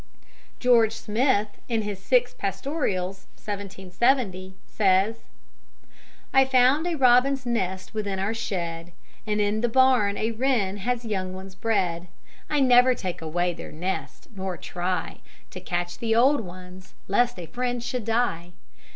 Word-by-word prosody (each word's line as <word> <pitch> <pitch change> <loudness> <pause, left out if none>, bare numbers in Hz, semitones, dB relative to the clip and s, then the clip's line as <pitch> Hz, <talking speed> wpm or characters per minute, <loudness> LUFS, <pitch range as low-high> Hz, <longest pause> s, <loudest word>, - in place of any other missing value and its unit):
'" - - -30
George 225 -3 +5
Smith, 225 -1 +1 0.2
in 225 -2 0
his 205 -2 -4
Six 245 +5 +2
Pastorals 195 - -3
(1770), 195 0 -1
says: 200 +2 +2 1.2
"I 270 - +7
found 265 +5 +3
a 345 - -1
robin's 260 0 +4
nest 190 -6 -2
within 205 -3 -2
our 195 +3 -1
shed, 170 -6 -4 0.3
And 210 0 0
in 210 +1 +1
the 240 - +1
barn 250 -5 +3
a 220 +1 -1
wren 225 -5 0
has 240 +3 -2
young 185 -4 -3
ones 190 0 -9
bred; 190 -4 -1 0.4
I 295 -2 +1
never 250 0 +6
take 185 -6 -5
away 175 +2 -1
their - - -9
nest, 180 +5 -5
nor 190 -2 -4
try 180 -1 -3 0.3
To 185 - -7
catch 175 -1 -3
the 225 -1 0
old 270 +5 +4
ones, 185 -1 -11
lest 240 +5 +2
a 175 - -6
friend 245 +7 -3
should 240 -2 -3
die. 220 -7 -1
210 Hz, 140 wpm, -25 LUFS, 185-245 Hz, 1.2 s, I